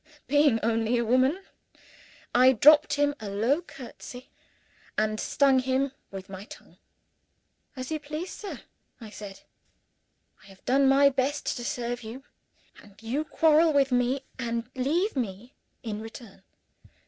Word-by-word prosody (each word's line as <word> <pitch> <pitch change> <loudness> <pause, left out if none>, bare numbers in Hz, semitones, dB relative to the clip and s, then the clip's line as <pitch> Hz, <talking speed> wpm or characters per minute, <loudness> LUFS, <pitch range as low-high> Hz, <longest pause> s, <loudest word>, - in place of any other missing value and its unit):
Being 290 -4 +3
only 225 +1 +1
a 235 - 0
woman, 260 - +2 0.9
I 255 +1 +6
dropped 295 +5 +6
him 290 0 +2
a 215 -2 -6
low 230 - +1
curtsey, 255 -4 -11 0.7
and 215 0 0
stung 275 -2 +3
him 260 +1 0 0.2
with 195 -1 -8
my 195 0 -9
tongue. - - -14 1.0
"As 255 +2 -6
you 310 - -1
please, 305 +5 -6
sir," 410 - -8 0.4
I 220 -3 -10
said. 200 -2 -10 1.0
"I - - -18
have 195 -1 -18
done 270 +1 +3
my 280 +1 +6
best 275 +2 -1
to 240 - -6
serve 240 0 -3
you 235 +4 -9 0.6
and 205 -1 -18
you 260 +7 -1
quarrel 315 +1 +3
with 275 -2 +3
me 250 +2 +1 0.2
and 235 0 -3
leave 315 +11 0
me, 235 0 -4 0.3
in 215 -2 -4
return. 225 -3 -11
255 Hz, 140 wpm, -27 LUFS, 225-280 Hz, 1.0 s, I